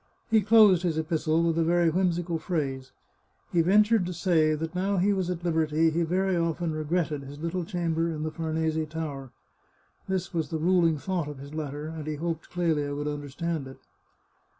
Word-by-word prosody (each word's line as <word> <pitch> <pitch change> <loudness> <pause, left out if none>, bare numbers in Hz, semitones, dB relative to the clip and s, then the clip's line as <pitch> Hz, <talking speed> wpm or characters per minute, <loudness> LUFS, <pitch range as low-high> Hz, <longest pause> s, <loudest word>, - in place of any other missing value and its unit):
He 220 -1 +5
closed 205 -3 +6
his 170 -4 -1
epistle 160 0 +1
with 165 -1 +1
a - - +3
very 170 0 +3
whimsical 175 -1 0
phrase: 135 -7 -3 0.6
he 170 - +4
ventured 205 +2 +4
to 180 - -4
say 160 -3 +2
that 160 +2 -4
now 190 +2 0
he 200 +3 +3
was 190 -2 -1
at 175 -1 -4
liberty, 160 -1 +2
he 165 +2 0
very 185 +3 +1
often 170 -1 -1
regretted 155 -1 -1
his 140 +1 -10
little 170 +3 -2
chamber 165 -1 -1
in 155 -2 -4
the 155 - -2
Farnese 160 0 -1
Tower. 150 -4 -5 0.8
This 190 -1 -2
was 160 -3 -1
the 160 - -2
ruling 165 -1 +3
thought 175 0 -2
of 145 -2 -7
his 140 +2 -10
letter, 150 -1 -4
and 160 -1 -7
he 155 - -2
hoped 165 +1 -4
Clelia 155 -5 0
would 145 +1 -3
understand 145 +1 -3
it. 135 - -11
165 Hz, 185 wpm, -27 LUFS, 155-175 Hz, 0.8 s, closed